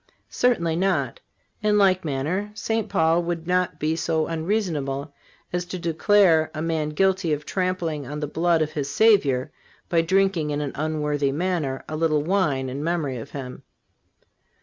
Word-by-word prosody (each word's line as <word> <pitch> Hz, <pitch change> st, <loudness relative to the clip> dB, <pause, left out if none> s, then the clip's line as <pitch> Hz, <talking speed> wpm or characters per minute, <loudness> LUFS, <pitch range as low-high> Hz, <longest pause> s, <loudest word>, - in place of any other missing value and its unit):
Certainly 170 Hz, -10 st, +1 dB
not. 170 Hz, -10 st, 0 dB, 0.4 s
In 210 Hz, 0 st, +3 dB
like 190 Hz, -2 st, +4 dB
manner, 160 Hz, +8 st, -2 dB
St. 225 Hz, 0 st, -2 dB
Paul 165 Hz, +1 st, +3 dB
would 170 Hz, -1 st, -3 dB
not 180 Hz, -3 st, 0 dB
be 155 Hz, +1 st, 0 dB
so 160 Hz, -1 st, 0 dB
unreasonable 160 Hz, -5 st, -2 dB, 0.4 s
as 180 Hz, 0 st, 0 dB
to 185 Hz, +1 st, -5 dB
declare 170 Hz, 0 st, +3 dB
a -, -, -4 dB
man 160 Hz, -2 st, -1 dB
guilty 190 Hz, +1 st, +1 dB
of 150 Hz, 0 st, -4 dB
trampling 175 Hz, -7 st, -2 dB
on 150 Hz, +2 st, -5 dB
the 150 Hz, -, -2 dB
blood 165 Hz, +2 st, +1 dB
of 155 Hz, -, -4 dB
his 145 Hz, -3 st, -3 dB
Savior 145 Hz, -, +3 dB, 0.4 s
by 170 Hz, -1 st, +3 dB
drinking 190 Hz, -2 st, +1 dB
in 145 Hz, 0 st, -1 dB
an 145 Hz, -2 st, -3 dB
unworthy 150 Hz, -2 st, -1 dB
manner 155 Hz, -4 st, -2 dB
a 155 Hz, -, -4 dB
little 155 Hz, -2 st, +1 dB
wine 150 Hz, -7 st, +1 dB
in 135 Hz, +3 st, -4 dB
memory 160 Hz, -6 st, -1 dB
of 115 Hz, -, -8 dB
Him. 130 Hz, -3 st, -7 dB
160 Hz, 160 wpm, -24 LUFS, 150-185 Hz, 0.4 s, like